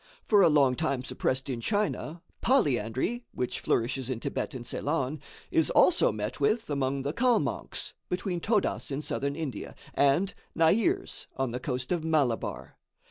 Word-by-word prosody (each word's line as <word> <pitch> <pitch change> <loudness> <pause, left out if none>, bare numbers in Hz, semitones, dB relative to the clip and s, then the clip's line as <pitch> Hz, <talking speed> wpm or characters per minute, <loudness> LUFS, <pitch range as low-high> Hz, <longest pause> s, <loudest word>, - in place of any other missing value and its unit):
For 205 -2 +5
a 175 - +7
long 140 -4 +4
time 140 -4 -1
suppressed 130 0 -1
in 125 -4 -3
China, 190 - -1 0.2
polyandry, 150 - +1
which 125 - -2
flourishes 125 +2 0
in 125 -3 -2
Thibet - - -3
and 120 -2 -6
Ceylon, 145 +2 -1 0.3
is - - +3
also - - +5
met 105 +4 -4
with 215 +5 +1
among 135 -1 0
the 140 +2 -2
Kalmonks, 245 +2 0 0.2
between 180 0 -2
Todas 205 -2 0
in 140 +2 -3
Southern 140 -1 -1
India, 155 -5 -5 0.2
and 145 +8 +3 0.2
Nairs 230 - +2
on 135 -3 0
the 125 - -3
coast 125 -1 -3
of 175 -3 0
Malabar. 145 -8 -1
140 Hz, 150 wpm, -29 LUFS, 130-180 Hz, 0.3 s, a